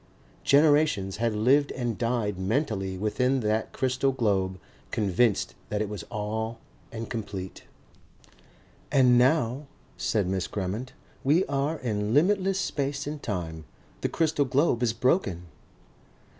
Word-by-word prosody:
Generations 145 -9 +3
had 115 -1 0
lived 135 +7 +3
and 120 -3 -2
died 115 -5 -1
mentally 95 -3 -1
within 125 +6 +1
that 110 0 0
crystal 130 +1 +1
globe, 95 -7 0 0.3
convinced 105 +1 +1 0.2
that 105 - -1
it 105 -1 -1
was 105 -4 -5
all 110 +2 -3 0.3
and 115 0 -5
complete. 100 -5 -6 1.3
"And 130 -3 +5
now," 130 +1 +2 0.3
said 105 -4 0
Miss 95 -1 -1
Grammont, 105 +6 -4 0.3
"we 155 +7 +3
are 140 +3 -1
in 110 -3 -1
limitless 190 +4 +3
space 140 -5 -2
and 145 0 -5
time. 80 -6 -4 0.4
The - - 0
crystal 155 -3 +1
globe 130 -1 +2
is 120 -2 +2
broken." 115 - +1
115 Hz, 125 wpm, -27 LUFS, 105-140 Hz, 1.3 s, And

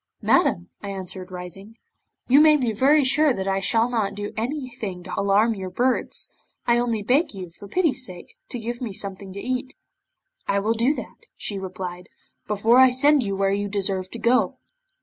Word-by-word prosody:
'"Madam," 85 - +2
I 200 - -6
answered, 190 -1 -6
rising, 185 +5 -9 0.5
"you 275 +4 +7
may 305 -1 +7
be 250 -5 0
very 280 +7 +4
sure 280 +2 +3
that 195 -3 -4
I 195 0 +1
shall 225 +4 +2
not 215 -5 -1
do 205 0 -5
anything 235 -7 -4
to 185 - -8
alarm 200 +3 +3
your 190 -3 -5
birds. 250 +6 -1 0.3
I 240 0 +3
only 230 -3 -1
beg 260 - +2
you, 185 -3 -7
for 200 +4 -12
pity's 300 - +1
sake, 180 -7 -7 0.2
to - - -3
give 240 +1 -5
me 230 -5 -4
something 195 0 -6
to 200 - -6
eat." 255 +3 -3 0.7
'"I 200 - +1
will 210 +3 +1
do 240 +6 +2
that," - - -9
she 200 -2 -4
replied, 180 -1 -6 0.4
"before 220 +4 +4
I 260 0 +8
send 285 +3 +4
you 200 -4 -2
where 195 0 +1
you 205 0 -1
deserve 190 -2 -1
to 235 - -7
go." 240 +2 +2
215 Hz, 190 wpm, -24 LUFS, 195-250 Hz, 0.7 s, I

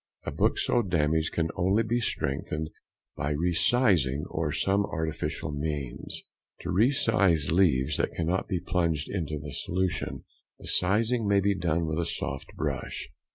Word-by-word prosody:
A - - -2
book - - +1
so 120 - +2
damaged 80 -5 +1
can 80 -1 0
only 95 +5 +2
be 120 +2 0
strengthened 75 - -2 0.4
by 70 - -2
re 85 +4 +1
sizing 85 - +3
or 80 -2 -1
some 100 +6 +2
artificial 80 -4 -3
means. 75 -4 -4 0.4
To 85 - -3
re 105 +8 +4
size 95 - +2
leaves 75 -5 +3
that - - -1
cannot 85 +3 0
be 95 -3 -1
plunged 85 -4 0
into 80 -6 -2
the 75 -2 -7
solution, 90 -1 -2 0.3
the - - -13
sizing 110 +4 +2
may 100 0 +4
be 100 +1 +2
done 85 -3 0
with 80 +1 -1
a 85 - 0
soft 70 - -4
brush. - - -3
85 Hz, 155 wpm, -28 LUFS, 75-100 Hz, 0.4 s, re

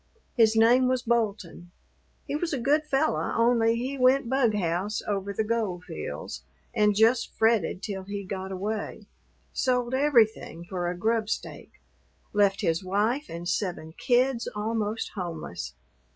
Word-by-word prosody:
His 225 -3 +4
name 240 +3 +5
was 255 -1 0
Bolton; 205 -7 -1 0.6
he - - -3
was 330 +1 -2
a 275 - -1
good 295 +5 +2
fellow, 300 +1 0
only 230 -1 +3
he 260 +4 -3
went 255 0 +4
bughouse 210 -6 0
over 200 -1 -2
the 210 +2 -1
gold 215 -5 -2
fields - - -6 0.3
and 210 -3 +3
just 225 +3 +3
fretted 220 -5 +2
till 190 -3 -4
he 200 0 -5
got 190 0 -5
away 205 +2 -4 0.5
sold 250 -1 0
everything 235 - +2
for 175 -1 -3
a 175 - -4
grub 220 +2 0
stake - - -5 0.6
left 200 -1 +3
his 165 -1 0
wife 215 +10 0
and 170 +1 -6
seven 175 -3 -2
kids 250 +3 +1
almost 215 0 -2
homeless. 165 - -6
220 Hz, 140 wpm, -27 LUFS, 190-245 Hz, 0.6 s, name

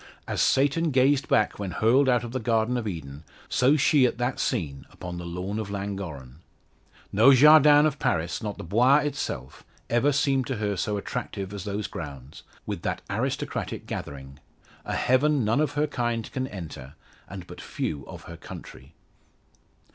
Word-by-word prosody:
As - - -1
Satan 145 +5 +2
gazed 135 +1 +3
back 105 - +2
when 100 -2 -3
hurled 125 +8 +3
out 120 -1 +3
of 120 - -6
the 130 - -2
Garden 115 +1 +1
of 120 -3 -2
Eden, 75 -6 -6 0.2
so 135 +4 +3
she 140 -2 +4
at 120 - -4
that 125 +1 -2
scene 70 -6 -2
upon 90 -1 -7
the 85 - -6
lawn 90 +5 -4
of 105 -2 -4
Llangorren. 95 -10 -6 0.8
No 115 +7 +7
jardin 150 +1 +7
of 150 -2 0
Paris 85 +5 -1
not 105 -3 -4
the - - -7
Bois 120 - +4
itself 140 - -4 0.3
ever 120 +5 +3
seemed 135 -2 +1
to 130 - -2
her 105 -1 -1
so 105 +3 -1
attractive 100 -1 -5
as 100 -3 -6
those 105 0 -3
grounds, 70 -8 -8 0.2
with - - -4
that - - -3
aristocratic - - -3
gathering 70 0 -7 0.5
a - - -3
heaven 135 0 +2
none 115 +7 +2
of 155 - 0
her 150 +1 +1
kind 120 -5 -2
can 130 -1 -2
enter, 80 - -9 0.3
and 95 -3 -8
but - - -10
few 70 -3 -4
of - - -10
her - - -10
country. - - -11
110 Hz, 170 wpm, -26 LUFS, 90-130 Hz, 0.8 s, No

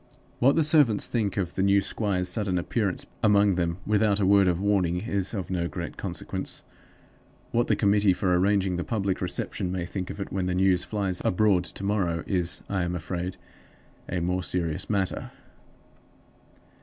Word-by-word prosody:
What 135 +3 +4
the 160 - +4
servants 145 -8 +4
think 110 -5 -1
of 90 -3 -1
the - - -2
new 100 +1 +4
squire's 95 -2 -1
sudden 95 -1 -1
appearance 100 +1 -1 0.2
among 105 -2 +4
them, 85 -1 -1
without 105 -1 +2
a 100 - +2
word 100 0 +5
of 90 -1 +1
warning, 95 -3 +1
is 100 -3 -1
of 95 -2 -4
no 85 -2 0
great 75 - -6
consequence. - - -4 0.9
What 120 +1 +1
the - - +3
committee 100 -1 +3
for 90 0 +1
arranging 95 0 +2
the 90 - -2
public 100 -4 -2
reception 90 0 -2
may 90 -2 -2
think 90 +1 -5
of - - -7
it 100 - -5
when 95 -1 -1
the 90 - -1
news 95 -1 +3
flies 95 -1 -2
abroad 95 -1 +2
to - - -7
morrow 95 -5 0
is, 90 -3 0
I 95 -2 -1
am 85 0 -2
afraid, 90 +2 -4 0.7
a 90 -1 -2
more 90 +2 0
serious 85 -3 -2
matter. 100 -3 0
95 Hz, 175 wpm, -26 LUFS, 90-100 Hz, 0.9 s, word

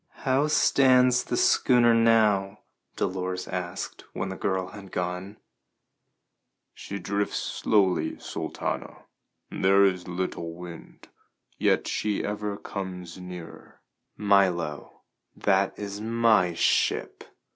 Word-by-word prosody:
"How 135 +3 +2
stands 130 -4 +4
the 120 - -2
schooner 120 -2 +4
now?" 105 -3 +3 0.3
Dolores 90 0 -3
asked 90 -1 -5
when 95 - -3
the 95 - -5
girl 95 -1 -2
had 100 -1 -11
gone. 90 +3 -4 1.4
"She 100 - -7
drifts 100 +2 -2
slowly, 95 -7 +1
Sultana. - - -5 0.5
There 95 +1 +4
is 90 -2 0
little 85 -2 -4
wind. 85 -1 -11 0.5
Yet - - +2
she 105 -1 -1
ever 105 0 -3
comes 90 -3 -7
nearer." 90 -2 -10 0.4
"Milo, 95 -7 +1 0.3
that 100 -1 +1
is 100 0 -6
my 110 -6 +2
ship!" - - +1
95 Hz, 105 wpm, -26 LUFS, 90-105 Hz, 1.4 s, stands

